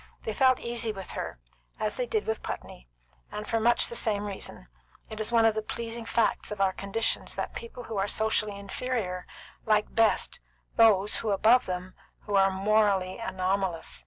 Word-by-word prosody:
They 220 Hz, -, -3 dB
felt 260 Hz, +2 st, +4 dB
easy 235 Hz, -1 st, -2 dB
with 195 Hz, -3 st, -8 dB
her, -, -, -5 dB, 0.4 s
as 215 Hz, -, -1 dB
they -, -, -2 dB
did 435 Hz, -3 st, -1 dB
with 220 Hz, 0 st, -2 dB
Putney, -, -, -7 dB, 0.4 s
and 210 Hz, 0 st, -6 dB
for 225 Hz, -, +1 dB
much 235 Hz, +2 st, +4 dB
the 235 Hz, -, -6 dB
same 210 Hz, -3 st, +1 dB
reason: 195 Hz, -, -6 dB, 0.4 s
it 220 Hz, -, -6 dB
is 215 Hz, +2 st, -1 dB
one 230 Hz, -1 st, +5 dB
of 225 Hz, -, +5 dB
the 215 Hz, -, -2 dB
pleasing 230 Hz, +1 st, -5 dB
facts 230 Hz, -1 st, +1 dB
of 210 Hz, -, -5 dB
our 195 Hz, -1 st, +3 dB
conditions 200 Hz, +4 st, -1 dB
that -, -, -3 dB
people 465 Hz, -, -8 dB
who 225 Hz, -3 st, -5 dB
are 195 Hz, +1 st, +1 dB
socially 215 Hz, -1 st, +1 dB
inferior 200 Hz, -2 st, -3 dB, 0.4 s
like 210 Hz, -1 st, +1 dB
best 225 Hz, -1 st, +2 dB, 0.4 s
those 210 Hz, -3 st, +4 dB
above 220 Hz, +4 st, +4 dB
them 180 Hz, 0 st, -4 dB, 0.3 s
who 205 Hz, -, -5 dB
are 195 Hz, 0 st, +5 dB
morally 195 Hz, 0 st, +2 dB
anomalous. 190 Hz, -, -1 dB
215 Hz, 175 wpm, -28 LUFS, 195-230 Hz, 0.4 s, one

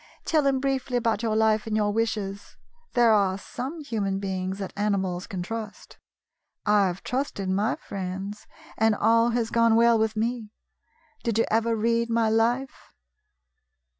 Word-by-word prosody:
Tell 305 Hz, -4 st, +2 dB
him 270 Hz, -1 st, +2 dB
briefly 265 Hz, -2 st, -1 dB
about 230 Hz, -3 st, 0 dB
your 225 Hz, -2 st, 0 dB
life 220 Hz, 0 st, +2 dB
and 215 Hz, -1 st, 0 dB
your 210 Hz, -1 st, +1 dB
wishes. 210 Hz, -3 st, -3 dB, 0.4 s
There 240 Hz, -3 st, +5 dB
are 195 Hz, -2 st, +2 dB
some 270 Hz, +10 st, -6 dB
human 205 Hz, -8 st, -2 dB
beings 190 Hz, -1 st, -3 dB
that 195 Hz, -2 st, -6 dB
animals 195 Hz, -3 st, -1 dB
can 185 Hz, -2 st, -4 dB
trust. 220 Hz, +1 st, -7 dB, 0.7 s
I 210 Hz, -2 st, +4 dB
have 180 Hz, +1 st, -5 dB
trusted 250 Hz, -7 st, -2 dB
my 205 Hz, +6 st, +1 dB
friends, 195 Hz, +1 st, -6 dB, 0.3 s
and 220 Hz, 0 st, +4 dB
all 230 Hz, +2 st, +3 dB
has 230 Hz, -1 st, -1 dB
gone 230 Hz, -1 st, +4 dB
well 230 Hz, 0 st, +5 dB
with 220 Hz, 0 st, 0 dB
me. 225 Hz, 0 st, -2 dB, 0.7 s
Did 230 Hz, -3 st, -1 dB
you 230 Hz, -, +3 dB
ever 225 Hz, +1 st, +2 dB
read 230 Hz, +1 st, +1 dB
my 230 Hz, -1 st, +2 dB
life 240 Hz, +4 st, 0 dB
220 Hz, 155 wpm, -26 LUFS, 200-235 Hz, 0.7 s, There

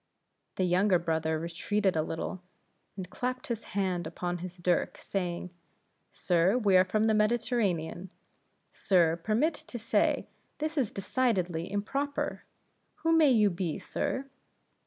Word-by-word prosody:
The 185 Hz, -, 0 dB
younger 185 Hz, +2 st, +3 dB
brother 160 Hz, -2 st, 0 dB
retreated 180 Hz, +4 st, -1 dB
a 155 Hz, -, +2 dB
little, 165 Hz, +3 st, -4 dB, 0.6 s
and 185 Hz, -2 st, -5 dB
clapped 255 Hz, +6 st, -3 dB
his 230 Hz, -2 st, -4 dB
hand 180 Hz, -4 st, 0 dB
upon 175 Hz, +2 st, -3 dB
his 180 Hz, +1 st, -7 dB
dirk, 175 Hz, 0 st, 0 dB
saying, 180 Hz, -2 st, -3 dB, 0.6 s
"Sir, 180 Hz, +5 st, +2 dB
we 205 Hz, -6 st, +3 dB
are 185 Hz, -, +7 dB
from 215 Hz, +3 st, 0 dB
the 220 Hz, 0 st, +3 dB
Mediterranean. 210 Hz, -6 st, 0 dB, 0.6 s
Sir, 170 Hz, -4 st, +3 dB
permit 230 Hz, -, +1 dB
me -, -, -12 dB
to 240 Hz, -, -6 dB
say, 230 Hz, 0 st, +1 dB, 0.3 s
this 310 Hz, +1 st, -3 dB
is 265 Hz, -8 st, 0 dB
decidedly 190 Hz, -6 st, -1 dB
improper! 275 Hz, +8 st, -2 dB, 0.6 s
Who 325 Hz, -, +3 dB
may 315 Hz, -3 st, +6 dB
you 215 Hz, -5 st, +4 dB
be, 170 Hz, -3 st, -2 dB
sir?" 265 Hz, -, -3 dB
190 Hz, 135 wpm, -30 LUFS, 175-230 Hz, 0.6 s, are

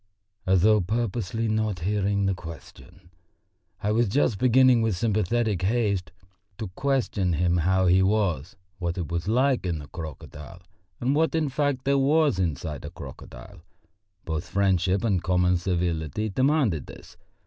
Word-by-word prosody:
As 95 Hz, -1 st, +3 dB
though 105 Hz, 0 st, +5 dB
purposely 110 Hz, +1 st, -2 dB
not 110 Hz, -4 st, -1 dB
hearing 100 Hz, +1 st, 0 dB
the 95 Hz, -, +1 dB
question, 85 Hz, 0 st, -12 dB, 0.7 s
I 105 Hz, -, +1 dB
was 115 Hz, +1 st, +2 dB
just 115 Hz, -3 st, +1 dB
beginning 130 Hz, -1 st, +5 dB
with 110 Hz, -4 st, +1 dB
sympathetic 110 Hz, 0 st, 0 dB
haste 100 Hz, -3 st, 0 dB, 0.5 s
to 110 Hz, -4 st, -5 dB
question 110 Hz, -5 st, -1 dB
him 85 Hz, +2 st, +1 dB
how 95 Hz, +3 st, +2 dB
he 90 Hz, +1 st, +4 dB
was, 95 Hz, -6 st, 0 dB, 0.2 s
what 85 Hz, -1 st, -3 dB
it 85 Hz, -4 st, -4 dB
was 85 Hz, +1 st, -2 dB
like 130 Hz, +4 st, +2 dB
in 90 Hz, -3 st, -2 dB
the 75 Hz, -2 st, -9 dB
crocodile, 80 Hz, +1 st, -9 dB, 0.4 s
and 130 Hz, +3 st, 0 dB
what, 160 Hz, +2 st, +1 dB
in 155 Hz, -3 st, +1 dB
fact, 140 Hz, -2 st, -1 dB
there 140 Hz, 0 st, +3 dB
was 145 Hz, -4 st, +2 dB
inside 80 Hz, -3 st, -3 dB
a -, -, -6 dB
crocodile. -, -, -11 dB, 0.6 s
Both 80 Hz, 0 st, -4 dB
friendship 95 Hz, -1 st, +1 dB
and 100 Hz, -6 st, +1 dB
common 90 Hz, 0 st, +2 dB
civility 85 Hz, +2 st, -2 dB
demanded 130 Hz, -, +1 dB
this. -, -, -13 dB
95 Hz, 150 wpm, -25 LUFS, 90-115 Hz, 0.7 s, though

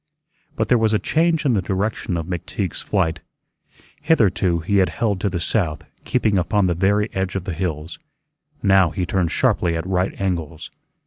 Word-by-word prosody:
But -, -, 0 dB
there 125 Hz, -, +4 dB
was 110 Hz, -1 st, +2 dB
a 105 Hz, -, -2 dB
change 160 Hz, -1 st, +2 dB
in 130 Hz, -, +3 dB
the 100 Hz, -, +1 dB
direction 95 Hz, -1 st, -2 dB
of 80 Hz, -, -3 dB
McTeague's 90 Hz, -1 st, -4 dB
flight. 85 Hz, -5 st, 0 dB, 0.8 s
Hitherto 100 Hz, -, +2 dB
he 100 Hz, +5 st, 0 dB
had 95 Hz, -1 st, +3 dB
held 100 Hz, -5 st, -1 dB
to 100 Hz, -, +1 dB
the 90 Hz, -2 st, -3 dB
south, 85 Hz, -2 st, -1 dB, 0.2 s
keeping 110 Hz, -6 st, +1 dB
upon 100 Hz, +3 st, +1 dB
the 90 Hz, -, +2 dB
very 100 Hz, +4 st, +2 dB
edge 95 Hz, 0 st, -2 dB
of 95 Hz, -, -2 dB
the 95 Hz, -1 st, -4 dB
hills; 80 Hz, -2 st, -4 dB, 0.6 s
now 95 Hz, -3 st, +5 dB
he 90 Hz, +2 st, -3 dB
turned 90 Hz, -1 st, 0 dB
sharply 85 Hz, -1 st, +1 dB
at 80 Hz, -, -4 dB
right 95 Hz, 0 st, -1 dB
angles. 85 Hz, -5 st, -3 dB
95 Hz, 180 wpm, -21 LUFS, 85-105 Hz, 0.8 s, now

